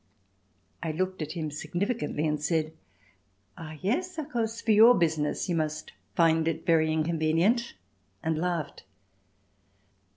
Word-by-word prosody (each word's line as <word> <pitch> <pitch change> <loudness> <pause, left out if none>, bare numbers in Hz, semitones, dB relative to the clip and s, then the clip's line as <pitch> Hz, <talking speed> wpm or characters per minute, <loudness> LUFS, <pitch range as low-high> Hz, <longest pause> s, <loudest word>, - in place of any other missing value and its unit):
I 165 - -2
looked 185 +2 -2
at 155 0 -4
him 160 -3 -4
significantly 175 0 -2
and 150 -1 -1
said: 155 0 0 0.8
"Ah, 155 -1 -9
yes, 345 - -1
of 310 -3 -4
course 230 -1 -2
for 225 - 0
your 225 +3 +8
business 155 -3 0
you 180 - 0
must 155 -2 -2 0.2
find 165 -1 +3
it 165 0 -2
very 160 -2 +3
inconvenient," 165 +9 +1 0.5
and 160 -1 0
laughed. 170 -1 -2
165 Hz, 130 wpm, -28 LUFS, 155-200 Hz, 0.8 s, your